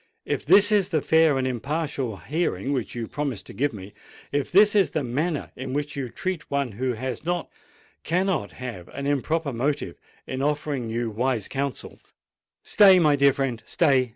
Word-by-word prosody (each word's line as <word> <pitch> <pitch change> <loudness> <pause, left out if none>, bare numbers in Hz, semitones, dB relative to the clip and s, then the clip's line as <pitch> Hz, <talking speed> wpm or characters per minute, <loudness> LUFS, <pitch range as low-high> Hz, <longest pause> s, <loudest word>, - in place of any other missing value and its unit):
"If - - -3
this 205 +2 +7
is 205 -3 +3
the 155 -4 0
fair 160 -3 +4
and 130 - 0
impartial 135 -2 -2
hearing 140 - -2
which 125 -4 -3
you 115 -2 -4
promised 140 -9 -4
to - - -11
give 145 +2 0
me,—if 105 +7 -7
this 205 +3 +6
is 200 -2 +4
the 155 - -2
manner 145 +6 -2
in 130 0 -6
which 145 0 -3
you 135 -3 -3
treat 185 +5 -4
one 140 -3 -1
who 125 +5 -2
has 125 +1 -4
not—cannot 175 +1 -3
have 120 -9 -7
an 140 - -4
improper 145 +1 0
motive 130 - -2 0.3
in 130 0 -4
offering 145 -4 -1
you 115 0 -2
wise 120 -1 -1
counsel——" 140 0 -4 0.6
"Stay, 195 -3 +6
my 155 -4 +4
dear 140 0 +5
friend—stay!" 135 +1 +1
140 Hz, 165 wpm, -25 LUFS, 125-155 Hz, 0.6 s, this